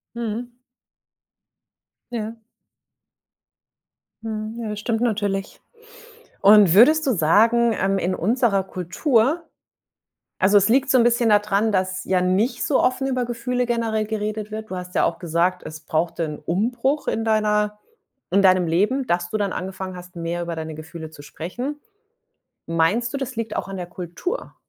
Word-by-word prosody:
Mhm. 235 +1 -4 1.6
Ja. 225 -1 -5 1.8
Mhm. 220 +1 -5
Ja, 220 - -4
das 210 0 -4
stimmt 225 +1 -1
natürlich. 205 -4 -1 0.8
Und, 205 -4 +7
würdest 305 - +6
du - - +4
sagen, 225 +7 +3
ähm, 195 +1 +1
in 185 0 -1
unserer 220 0 +1
Kultur 225 - 0 1.0
Also, 200 +2 +5
es 200 +1 +2
liegt 265 +4 +2
so 260 - +5
'n 235 - +4
bisschen 240 -1 +3
da 210 - +7
dran, 210 +1 0
dass 185 -1 -1
ja 185 -1 +1
nicht 185 +7 +1
so 280 - +2
offen 255 +1 +1
über 255 -2 0
Gefühle 245 +1 -2
generell 230 -2 -1
geredet 215 0 -3
wird. 220 0 -7
Du - - -4
hast 180 0 -7
ja - - +4
auch - - -1
gesagt, 175 +1 0
es 155 0 -9
brauchte 165 +1 -1
'n 150 -1 -5
Umbruch 240 - 0
in 225 - -1
deiner 210 -1 +1 0.5
in 195 +1 +4
deinem 185 -2 +4
Leben, 210 +11 +1
dass 175 -2 -1
du - - -1
dann 200 -3 -1
angefangen 185 0 -5
hast, 180 0 -12
mehr 170 +1 -3
über 170 -1 -4
deine 160 -1 -5
Gefühle 160 +1 -9
zu 150 -2 -13
sprechen. 245 - -6 0.9
Meinst 180 +9 +1
du, - - -1
das 265 -2 -5
liegt 225 0 -4
auch - - -3
an 195 0 -6
der 180 -1 -5
Kultur? 180 - -5
210 Hz, 160 wpm, -22 LUFS, 180-235 Hz, 1.8 s, Und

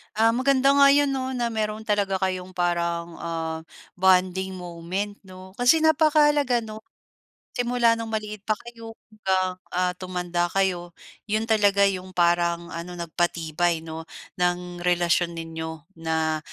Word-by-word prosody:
Ah, 225 +1 +4
maganda 265 +2 +3
nga 280 0 +6
'yon 285 -1 +3
'no, 260 -1 -2
na 240 -1 -1
meron 215 -1 -2
talaga 205 -2 0
kayong, 185 -1 -3
parang 170 -1 -1
ah, 165 -1 -3 0.4
bonding 190 0 +3
moment, 180 +3 -5
'no. 185 0 -12
Kasi 275 +6 +5
napakahalaga 295 -5 +4
'no, 215 0 -8 0.8
simula 240 -1 +2
no'ng 230 - -4
maliit 215 -1 -4
pa 215 - +2
kayo 230 -1 -10 0.2
hanggang 190 -3 0 0.2
ah, 180 0 +2
tumanda 180 -1 -2
kayo, 180 -3 0 0.3
'yon 215 +1 0
talaga 205 -2 +4
'yung 185 -1 -4
parang 170 0 +1
ano, 175 +1 -6
nagpatibay 170 -1 -1
'no, 160 0 -7 0.4
ng 180 0 -1
relasyon 175 -1 +2
ninyo 160 -1 -6 0.2
na 160 -1 0
185 Hz, 135 wpm, -25 LUFS, 175-220 Hz, 0.8 s, nga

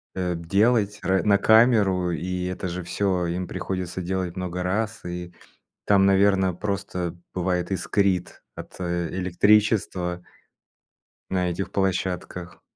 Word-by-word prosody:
э, 90 -2 -1
делать 105 +5 +1
р 95 0 +2
на 100 -1 +4
камеру. 105 -5 +4
И 90 +2 -3
это 90 +1 -3
же 90 +1 -4
всё 90 0 0
им 90 +1 -3
приходится 90 -1 -4
делать 90 -1 -2
много 90 -1 -4
раз, 110 +5 -2
и 90 0 -6 0.5
там, 100 -1 +4
наверно, 95 -1 +3
просто 90 -3 -3 0.2
бывает 90 0 -1
искрит 95 0 0
от, - - -10
э, 85 -1 -1
электричества 95 -1 +2 1.1
на 90 -1 0
этих 95 +3 -4
площадках. 90 -2 -2
90 Hz, 120 wpm, -24 LUFS, 90-100 Hz, 1.1 s, на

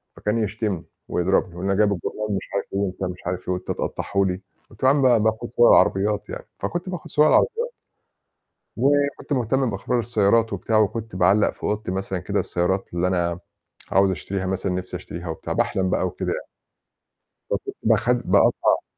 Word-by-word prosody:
فكان 105 +2 -1
يشتمني 100 -3 -2 0.2
ويضربني 90 +1 +1
يقول 90 +2 -6
لي: 100 - +1
"أنا - - -1
جايب 105 -1 +4
الجورنال،" 105 +3 -3
مش - - -4
عارف 100 - 0
إيه، 100 - 0
وأنت 95 -1 -2
مش 90 -1 -4
عارف 90 +1 -4
إيه، 90 - +2
"وأنت 90 - -6
تقطعّه - - -4
لي!" 90 0 -2 0.3
قُلت - - -14
له: 130 - +6
"يا - - +5
عم 145 - +2
ب 120 -5 +4
باخد 110 +2 0
صور 120 - +5
العربيات." 100 +1 +3
يعني، - - -7
فكنت 175 +2 -3
باخد 180 -3 -6
صور 150 +1 +5
العربيات 475 - +2 1.0
وكنت 140 +3 +1
مهتم 130 +1 +1
بإخبار 110 +5 -1
السيارات 110 -1 +2
وبتاع 105 +3 0
وكنت 110 0 0
باعلّق 95 +3 +4
في - - -22
أوضتي 105 -2 -1
مثلًا 95 -1 -3
كده 90 - -1
السيارات 90 +2 -1
اللي 90 +1 +1
أنا 85 -2 0 0.5
عاوز 95 +1 +4
أشتريها 95 +2 -3
مثلًا، 95 0 -1
نفِسي 90 0 -4
أشتريها 85 +1 -7
وبتاع، 80 - -4
باحلم 95 -1 0
بقى - - +1
وكده 90 - -3
يعني. - - -5 1.0
ب - - +1 0.3
باخ - - +2
باقطّع - - +3
100 Hz, 185 wpm, -23 LUFS, 90-115 Hz, 1.0 s, له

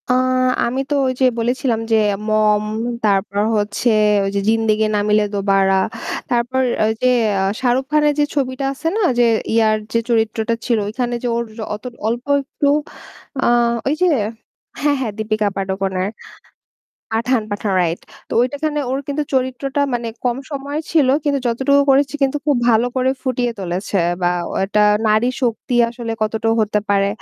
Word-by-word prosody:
আ - - +4 0.5
আমি 250 +3 -2
তো 290 - +1
ওই 255 - 0
যে - - +5
বলেছিলাম 240 0 0
যে - - +5 0.3
'মম', 215 -1 +2 0.4
তারপর 200 -1 +1 0.2
হচ্ছে 205 +3 0 0.4
ওই - - 0
যে - - +2
'জিন্দেগি 220 -1 +2
না - - +2
মিলে 210 0 +4
দোবারা।' 195 -1 +2 0.5
তারপর 245 +2 0 0.3
ওই - - +2
যে 255 - +3 0.3
আ - - +1 0.2
শাহরুখ 255 +1 +1
খানের 300 -1 +3
যে - - +5
ছবিটা 265 -1 -1
আছে 300 +4 -5
না? - - 0
ওই - - +1
যে 240 - +5 0.3
ইয়ার 220 -1 +3 0.2
যে 230 - +3
চরিত্রটা 225 0 +1
ছিল 235 -3 +2
ওইখানে 240 +3 -2
যে - - 0
ওর 235 - 0 0.3
অত 210 - -12 0.2
অল্প 235 +2 -2 0.2
একটু 275 +1 -2 0.8
আ - - +2 0.4
ওই 280 - +2
যে 365 - +5 0.7
হ্যাঁ, 290 0 +2
হ্যাঁ, 245 -5 -2
দীপিকা 215 -1 0
পাডুকনের 190 -1 -2 1.0
'পাঠান', 230 +1 +1
'পাঠান' 205 -1 -2
right. 170 0 -1 0.3
তো - - -8
ওইটাখানে 290 +4 -1
ওর 265 - 0
কিন্তু 285 +1 -1
চরিত্রটা 260 +2 -1
মানে 235 -1 -2 0.2
কম 245 -1 +1
সময়ের 285 +2 -4
ছিল। 305 -5 +4 0.2
কিন্তু 285 -1 +1
যতটুকু 265 +4 +3
করেছে 275 +1 +3
কিন্তু 275 +1 +2
খুব 290 -3 +3
ভালো 230 +1 +3
করে 260 0 +2
ফুটিয়ে 250 -2 -1
তুলেছে 190 +2 -2 0.2
বা 175 - +3 0.3
একটা 205 +2 +1 0.3
নারীশক্তি 240 +2 0
আসলে 235 -1 -5
কতটা 220 +1 -1
হতে 210 -1 +1
পারে। 200 0 +3
235 Hz, 160 wpm, -19 LUFS, 215-265 Hz, 1.0 s, যে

